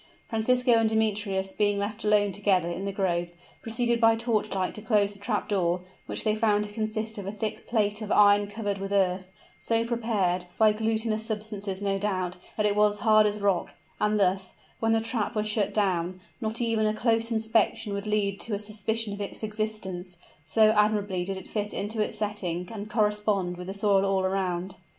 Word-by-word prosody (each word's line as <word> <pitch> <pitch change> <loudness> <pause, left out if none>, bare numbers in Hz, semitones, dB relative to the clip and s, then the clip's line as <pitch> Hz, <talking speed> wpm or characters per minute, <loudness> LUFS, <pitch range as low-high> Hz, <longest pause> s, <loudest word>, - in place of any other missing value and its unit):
Francisco 250 +3 +2
and 225 -1 +4
Demetrius, 205 -3 0
being 205 0 +1
left 205 +1 -3
alone 210 -1 +3
together 190 -3 +1
in 175 +3 -4
the 200 - -1
grove, 175 -3 -1 0.3
proceeded 235 +1 0
by 225 0 +6
torchlight 215 -5 -1
to 215 - -8
close 210 -2 +2
the 200 - -16
trap 210 +1 -2
door, 180 -3 +1 0.3
which - - -2
they 215 - +2
found 210 -1 +2
to 210 - -7
consist 215 0 -3
of 195 - -6
a - - -2
thick 215 0 -4
plate 210 -2 0
of 210 - -5
iron 205 0 +5
covered 205 -1 -3
with 195 0 -5
earth, 185 -2 +1 0.3
so 230 0 +1
prepared, 215 -7 0
by 215 -1 +5
glutinous 220 0 0
substances 210 -3 -4
no 195 -1 0
doubt, 185 -3 -1 0.2
that 210 - +1
it 205 -1 +2
was 210 0 +3
hard 215 -1 +5
as 210 0 -3
rock; 195 -3 0 0.2
and 210 0 +2
thus, 190 -1 +1 0.2
when 225 0 +1
the 225 0 +3
trap 225 -1 -2
was 215 0 0
shut 210 -1 +1
down, 185 -3 0 0.2
not 220 0 -1
even 225 -2 +1
a 215 - 0
close 225 0 +1
inspection 220 -1 +1
would 200 +1 -4
lead 200 -2 0
to 220 - -1
a - - -1
suspicion 215 +1 -2
of 200 - -6
its 200 - -6
existence, 210 -5 -4 0.3
so 215 +7 +4
admirably 210 -3 +1
did 195 +1 -3
it 190 - -7
fit 210 -1 -3
into 215 +2 -1
its 210 - -2
setting 180 -5 -2
and 210 -1 -6
correspond 210 -4 +1
with 180 0 -8
the 190 - -4
soil 200 -1 +3
all 195 -1 +1
around. 185 -1 -2
210 Hz, 195 wpm, -27 LUFS, 195-220 Hz, 0.3 s, by